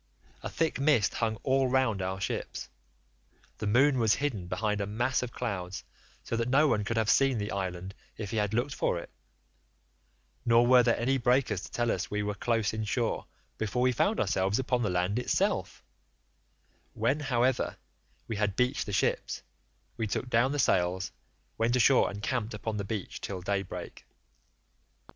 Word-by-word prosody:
A - - -4
thick 165 -4 -1
mist 140 -8 +3
hung 110 -2 0
all 135 -1 +2
round 125 -6 +1
our 95 +1 -2
ships;79 100 - -4 0.9
the 105 - -2
moon 130 +5 +4
was 110 -2 +4
hidden 125 -11 -2
behind 105 +3 -1
a 100 - -2
mass 120 +5 0
of 125 -1 -4
clouds 95 -7 -4 0.4
so - - -3
that 115 +1 -1
no 145 +4 +5
one 110 -6 +1
could 115 +3 -2
have 110 -2 +2
seen 135 +1 +4
the 105 0 -3
island 95 -1 -4 0.2
if 105 -2 -5
he 115 - -2
had 105 -1 +1
looked 120 +5 0
for - - 0
it, 85 - -8 1.3
nor 120 0 +5
were 125 0 +7
there 120 -1 +2
any 135 +3 +1
breakers 125 -5 +2
to - - -9
tell 120 -1 0
us - - -2
we 105 0 -1
were 105 0 -1
close 110 0 0
in 110 0 -2
shore 115 +2 -1 0.3
before 110 +3 0
we 130 - +4
found 200 - +1
ourselves 95 +3 +1
upon 125 -1 0
the 105 - 0
land 90 +5 0
itself; 125 - -1 1.1
when, 125 +7 +1
however, 130 -2 +1 0.5
we 110 - -3
had 105 -2 0
beached 125 +1 0
the - - -3
ships, 95 - 0 0.5
we 110 -2 -1
took 125 +4 -3
down 120 +4 +3
the 145 - -1
sails, 90 -6 +1 0.5
went 115 +2 +2
ashore 125 +2 +5
and 100 +1 -7
camped 115 -2 -1
upon 105 +1 -4
the 100 - -2
beach 100 -1 -5
till 95 -2 -4
daybreak. 100 +1 -4
115 Hz, 175 wpm, -29 LUFS, 100-125 Hz, 1.3 s, were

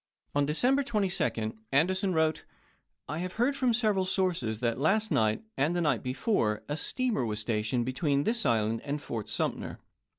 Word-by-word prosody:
On 145 0 +2
December 255 - +2
22d 180 - -1 0.2
Anderson 185 +7 +2
wrote: 160 -2 +1 0.6
I 155 +3 -3
have 180 +1 -4
heard 245 +5 +1
from 255 -3 +2
several 215 -5 +2
sources, 170 - 0
that 120 0 0
last 210 +9 +2
night, 110 - +2
and 150 +6 +1
the - - +1
night 145 -8 +1
before, 125 - 0
a 145 - -2
steamer 245 - -1
was 110 -2 -1
stationed 110 +2 0
between 140 +2 +1
this 230 +5 0
island 115 -3 +1
and 145 +1 -2
Fort 115 -6 -5
Sumter. - - -2
150 Hz, 165 wpm, -29 LUFS, 120-195 Hz, 0.6 s, On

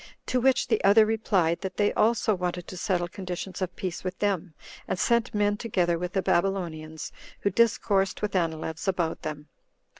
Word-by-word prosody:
To 250 - 0
which 265 +1 +3
the - - +1
other 205 +2 +7
replied, 200 -6 +1
that 190 -1 -5
they 205 -1 +2
also 225 0 +2
wanted 180 -2 -3
to - - -7
settle 180 -2 0
conditions 185 +1 -6
of 185 -1 -2
peace 185 -2 -4
with 185 0 -4
them, 190 -5 -1 0.3
and - - -1
sent 235 +4 +2
men 205 0 +2
together 180 -7 0
with 180 +1 -4
the 195 -2 0
Babylonians, 170 -4 -1 0.3
who 200 - +1
discoursed 200 -2 +2
with 210 -1 -1
Anileus 160 0 -2
about 175 -4 0
them. 150 -1 -6
185 Hz, 175 wpm, -27 LUFS, 175-205 Hz, 0.3 s, other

